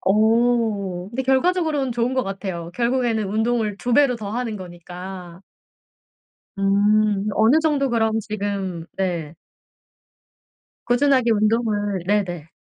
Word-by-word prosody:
어. 215 -3 +1
근데 260 +3 -2
결과적으로는 290 -1 +1
좋은 240 +2 -1
것 260 - +1
같아요. 190 -4 -5
결국에는 235 -4 0
운동을 220 0 0
2 245 +4 -3
배로 275 -2 +4
더 205 -3 -6
하는 230 -2 -3
거니까. 180 0 -9 1.2
음. 205 +1 +2
어느 225 +8 +4
정도 290 -4 +1
그럼 225 -2 +1
지금 200 -5 -4
네. 170 -5 -2 1.5
꾸준하게 255 -1 +3
운동을 210 -3 +1
네네, 180 -6 -1
215 Hz, 235 characters per minute, -22 LUFS, 195-240 Hz, 1.5 s, 배로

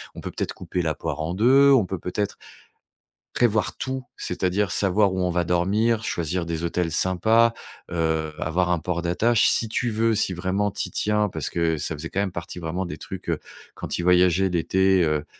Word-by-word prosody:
on - - -8
peut - - -6
peut-être - - -3
couper 90 - -3
la 80 -2 -1
poire 80 - -4
en 80 +3 -2
deux, 135 +6 +5
on 120 -8 +5
peut 95 -1 -5
peut-être 100 +4 -3 1.0
prévoir 110 -3 +1
tout, 130 0 -4
c'est-à-dire 90 +1 -1
savoir 100 0 +2
où 95 - -2
on 90 0 +1
va 90 0 0
dormir, 105 +7 +1
choisir 85 +1 -2
des 85 0 -4
hôtels 85 -1 -1
sympas, 110 +7 +3 0.4
heu, 80 -2 0
avoir 90 +3 0
un 85 - +1
port 85 +1 -2
d'attache, 105 +7 +3
si 115 - +2
tu 120 +2 -1
veux, 110 0 +1
si 95 - +1
vraiment 95 +3 -1
tu - - -3
y - - -20
tiens», 105 0 +1
parce 80 -3 -3
que 85 -1 0
ça 75 +2 -3
faisait 80 +3 -6
quand 100 - -1
même 95 -3 -2
partie 85 +1 -7
vraiment 85 +3 -3
des - - -6
trucs, - - -8
heu, - - 0 0.3
quand - - -4
il 85 - -3
voyageait 90 +1 +4
l'été, 95 +2 +2
heu 75 -1 0
90 Hz, 205 wpm, -24 LUFS, 85-105 Hz, 1.0 s, deux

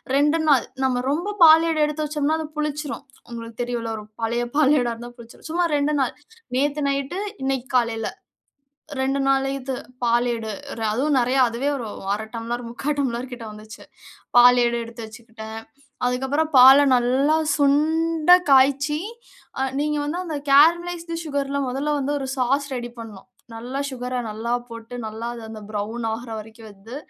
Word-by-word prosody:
2 295 +3 +3
நாள். 280 -5 +4 0.2
நம்ம 255 -2 +1
ரொம்ப 345 +9 -1
பாலேடு 325 0 +7
எடுத்து 300 +1 -3
வச்சோம்னா 300 0 0
அது 320 - -4
புளிச்சிரும். 300 -1 -3 0.3
உங்களுக்கு 230 -1 -8
தெரியும்ல்ல 240 -1 -3
ஒரு 215 - -8 0.2
பழைய 235 +2 0
பாலேடா 275 -5 +3
இருந்தா 235 +1 -9
புளிச்சிரும். 235 -1 -14
சும்மா 345 +2 +1
2 290 +1 +1
நாள் 265 - 0 0.4
நேத்து 290 +2 0
நைட்டு 280 +5 -2 0.2
இன்னைக்கு 265 -1 -1
காலையில. 230 -2 +1 0.9
2 270 +1 0
நாள் 270 0 +2
இது 265 0 -4 0.3
பாலேடு, 235 -2 0 0.4
அதுவும் 275 +4 +1
நெறையா 255 +2 +2
அதுவே 240 +5 -2
ஒரு 235 -4 -5 0.3
1/2 220 +1 -6
டம்ளர் 235 +1 -4
3/4 265 +5 -3
டம்ளர் 255 -1 -2
கிட்ட 240 -1 -8
வந்துச்சு. 215 0 -12 0.5
பாலேடு 245 -1 +6
எடுத்து 230 0 -8
வச்சுக்கிட்டேன். 220 -1 -10 0.5
அதுக்கப்பறம் 265 +5 -1
பால 265 +2 +10 0.2
நல்லா 260 +5 +2 0.2
சுண்ட 315 +3 +2 0.2
காய்ச்சி 280 +3 +3 0.6
அ - - +1 0.2
நீங்க 300 0 0
வந்து 315 +5 -3
அந்த 315 -4 -3
கேரமலைஸ்ட் 335 +3 +4
சுகர்ல 280 -2 -2
மொதல்ல 275 +4 -2
வந்து 280 +1 -2
ஒரு - - -3
சாஸ் 275 +3 +1
ரெடி 240 0 -5
பண்ணும். 215 -4 -10 0.3
நல்லா 245 +4 -5
சுகர 250 -1 -4
நல்லா 220 +2 -4 0.2
போட்டு 230 0 -9
நல்லா 220 +2 -5
அது 235 - -9
அந்த 220 -1 -9
ப்ரவுன் 215 +3 -4
ஆகுற 230 +2 -6
வரைக்கும் 220 +1 -11
வந்து, 205 +5 -12
260 Hz, 150 wpm, -23 LUFS, 235-290 Hz, 0.9 s, பால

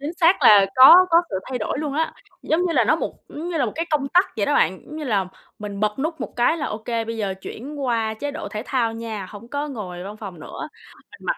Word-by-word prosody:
Chính 295 +4 -4
xác 340 +3 +4
là 200 -2 +7
có 345 +8 +9
có 335 +1 +6
sự 195 - -2
thay 255 - -2
đổi 220 +5 -3
luôn 295 -2 -3
á, 320 +2 -1 0.3
giống 320 - +1
như 340 - -1
là, 245 -7 +3
nó 310 +8 +3
một - - -4
giống 325 +4 -6
như 335 - -2
là 265 - +2
một 215 - -4
cái 330 - -2
công 280 -2 0
tắc 360 +6 +4
vậy 205 -2 0
đó - - +1
bạn, 185 +3 +2
giống 305 - -9
như 305 - -5
là 200 -7 0 0.3
mình 205 -1 -6
bật 210 +3 0
nút 320 +3 -3
một - - -6
cái 245 +7 +3
là 305 - -3
ô 210 - -4
kê, 230 0 -3
bây 230 0 -5
giờ 200 -3 -2
chuyển 270 +10 -8
qua 225 -3 0
chế 285 +6 -4
độ 285 -8 -6
thể 215 +2 -5
thao 235 -4 0
nha, 225 -4 -6
hổng 220 +3 -11
có 290 +2 -3
ngồi 185 -9 -6
văn 205 +2 -8
phòng 190 -7 -9
nữa, - - -7 0.4
mình - - -14
mặc - - -1
240 Hz, 280 wpm, -22 LUFS, 210-305 Hz, 0.4 s, có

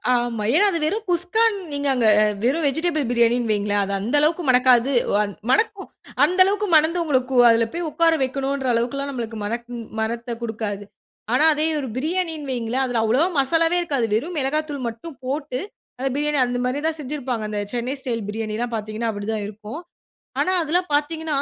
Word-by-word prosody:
ஆமா. 240 -3 -1
ஏனா 410 - +5
அது 335 - -1
வெறும் 425 +7 -2
குஸ்கான்னு 395 +4 +2
நீங்க 285 0 -2
அங்க 240 -3 +2 0.4
வெறும் 290 +6 +1
வெஜிடபிள் 310 0 0
பிரியாணின்னு 235 -1 +2
வைங்களேன். 205 -1 +1
அது 200 0 -3
அந்த 230 +8 -1
அளவுக்கு 320 +4 +1
மணக்காது. 255 0 +4 0.2
வ 205 - +4 0.3
மணக்கும்! 425 +2 +1 0.4
அந்த 365 +1 +2
அளவுக்கு 410 +1 0
மணந்து, 320 +3 +3
உங்களுக்கு 260 -4 0
அதில 230 0 +4
போய் 340 -1 -3
உக்கார 330 +1 +3
வெக்கணும்ன்ற 270 0 -2
அளவுக்கெல்லாம் 275 +4 -1
நமக்கு 230 -3 -5
மணக்கும் 235 +2 -4 0.2
மணத்த 235 +1 -2
கொடுக்காது. 215 -3 -4 0.5
ஆனா 310 - +4
அதே 305 +2 0
ஒரு 265 - -4
பிரியாணின்னு 320 -1 -2
வைங்களேன். 245 +1 -1
அதில 245 -3 0
அவ்வளவா 250 +10 +3
மசாலாவே 330 +5 +2
இருக்காது. 280 -8 0
வெறும் 310 +9 -2
மிளகாத்தூள் 285 -1 -2
மட்டும் 255 +6 -8
போட்டு, 275 -1 -3 0.4
அந்த 270 - 0
பிரியாணி 295 -1 0
அந்த 245 0 -2
மாரி 255 +3 -1
தான் 320 - -1
செஞ்சிருப்பாங்க. 260 -5 -3
அந்த 210 - -3
சென்னை 245 +3 -2
ஸ்டைல் 235 -5 -3
பிரியாணிலாம் 225 +2 -3
பார்த்தீங்கன்னா 215 +1 -3
அப்படி 205 0 -6
தான் 210 -2 -3
இருக்கும். 215 - -8 0.6
ஆனா 370 - +2
அதெல்லாம் 350 +3 0
பாத்தீங்கன்னா, 310 +1 -1
265 Hz, 170 wpm, -22 LUFS, 230-315 Hz, 0.6 s, ஏனா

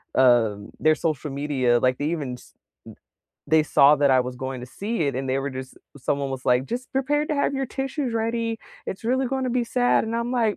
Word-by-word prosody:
Um, 115 -6 +3
their 155 0 +4
social 155 -2 -2
media 135 -4 +1
like, 130 +1 +2
they 145 - -2
even 145 -7 -3
s 125 - -13
m - - -48 0.9
they 155 -1 +5
saw 145 0 +6
that 140 -1 +3
I 130 - +5
was 125 0 -4
going 130 0 -5
to 125 - -8
see 215 -1 -1
it 140 - -3
and 135 0 -3
they 130 - +1
were 140 +1 -3
just 130 0 -8 0.2
someone 140 +1 -1
was 130 -1 -5
like, 125 0 +3
"Just 250 +2 -5
prepared 295 +3 0
to 305 - 0
have 280 - +1
your 270 0 -1
tissues 270 -1 -3
ready, 230 0 -1 0.3
it's 190 - -5
really 260 +3 +1
gonna 260 0 -1
be 245 0 +1
sad." 245 0 +2
And 225 +1 -3
I'm 235 +1 -2
like, 230 -4 +1
155 Hz, 225 wpm, -24 LUFS, -, 0.9 s, saw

